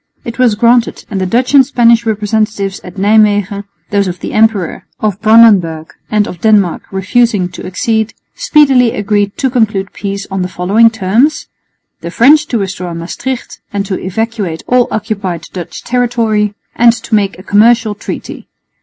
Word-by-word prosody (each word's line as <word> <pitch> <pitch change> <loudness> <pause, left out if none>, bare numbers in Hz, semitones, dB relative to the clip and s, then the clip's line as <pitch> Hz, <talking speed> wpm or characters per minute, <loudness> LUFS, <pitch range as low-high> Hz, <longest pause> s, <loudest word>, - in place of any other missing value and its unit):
It 235 +1 -7
was 245 -4 +3
granted, 235 +2 +1
and 195 -2 -2
the 185 - -1
Dutch 250 +7 0
and 275 -2 +7
Spanish 235 -3 +2
representatives 210 -2 -1
at 180 - -11
Nijmwegen 205 0 +2 0.3
(those 200 -1 +1
of 180 -1 -5
the - - -6
emperor, 215 -5 0
of 210 -2 -2
Brandenburg 205 -8 +4 0.2
and 210 -1 +1
of 175 - -9
Denmark 205 -6 +2
refusing 200 0 +1
to 180 - -10
accede) 220 +3 -1 0.2
speedily 270 - +3
agreed 205 -1 -1
to 265 -2 -1
conclude 215 -5 -1
peace 200 0 -5
on 190 -1 -2
the 180 - -1
following 195 +6 +3
terms: 225 +8 0 0.5
the 170 - -7
French 295 - +4
to 240 - -1
restore 185 -4 -4
Maestricht 235 +10 -6
and 200 -1 -2
to 195 -2 -3
evacuate 200 -3 -3
all 250 -1 +2
occupied 200 -6 -4
Dutch 175 -3 -7
territory, 230 -4 0 0.2
and 235 0 +5
to 225 -1 -8
make 200 -2 +1
a 185 - -12
commercial 225 +2 +3
treaty. 205 - -8
210 Hz, 160 wpm, -12 LUFS, 195-230 Hz, 0.5 s, and